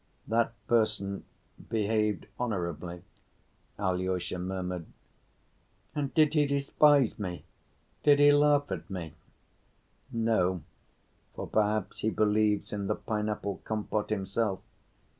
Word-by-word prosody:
"That 115 Hz, +1 st, +2 dB
person 110 Hz, -4 st, +1 dB, 0.4 s
behaved 105 Hz, -1 st, +1 dB
honorably," 90 Hz, -6 st, -3 dB, 0.7 s
Alyosha 95 Hz, -2 st, -1 dB
murmured. 90 Hz, -2 st, -3 dB, 1.1 s
"And 145 Hz, -3 st, -2 dB
did 155 Hz, -2 st, +5 dB
he 150 Hz, -2 st, +3 dB
despise 140 Hz, -2 st, +3 dB
me? 90 Hz, -6 st, -5 dB, 0.6 s
Did 145 Hz, -1 st, +6 dB
he 145 Hz, 0 st, +7 dB
laugh 145 Hz, 0 st, +4 dB
at -, -, -4 dB
me?" 85 Hz, -5 st, -5 dB, 1.0 s
"No, 110 Hz, -7 st, +1 dB, 0.7 s
for -, -, -4 dB
perhaps 105 Hz, -2 st, 0 dB
he 110 Hz, -, +1 dB
believes 105 Hz, -1 st, +1 dB
in 100 Hz, -1 st, -2 dB
the -, -, +1 dB
pineapple 105 Hz, -2 st, -3 dB
compote 105 Hz, -1 st, -2 dB
himself. 100 Hz, 0 st, -1 dB
105 Hz, 105 wpm, -30 LUFS, 95-115 Hz, 1.1 s, he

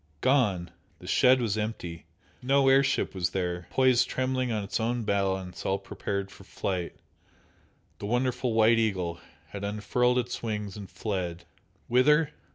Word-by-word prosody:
Gone! 105 Hz, -11 st, +2 dB, 0.3 s
The -, -, -14 dB
shed 130 Hz, +1 st, +4 dB
was 110 Hz, -3 st, -1 dB
empty! 90 Hz, -6 st, -5 dB, 0.3 s
No 135 Hz, +1 st, +3 dB
air 135 Hz, +1 st, +6 dB
ship 140 Hz, -, 0 dB
was 90 Hz, -2 st, -1 dB
there, 90 Hz, -1 st, -3 dB
poised 130 Hz, -2 st, +3 dB
trembling 130 Hz, -1 st, -1 dB
on 105 Hz, -2 st, -1 dB
its 100 Hz, -, -2 dB
own 120 Hz, +1 st, -1 dB
balance 95 Hz, -3 st, -1 dB
all 95 Hz, -, +1 dB
prepared 100 Hz, 0 st, -4 dB
for -, -, -14 dB
flight, 90 Hz, -3 st, -3 dB, 1.0 s
the 100 Hz, -, -5 dB
wonderful 125 Hz, +1 st, 0 dB
"White 115 Hz, +1 st, +5 dB
Eagle" 90 Hz, -6 st, -1 dB, 0.3 s
had 100 Hz, -1 st, -7 dB
unfurled 115 Hz, +5 st, +1 dB
its 125 Hz, 0 st, -2 dB
wings 105 Hz, -3 st, -3 dB
and 100 Hz, -3 st, -8 dB
fled! 90 Hz, -5 st, -4 dB, 0.4 s
Whither? 150 Hz, +5 st, +4 dB
110 Hz, 150 wpm, -28 LUFS, 95-125 Hz, 1.0 s, air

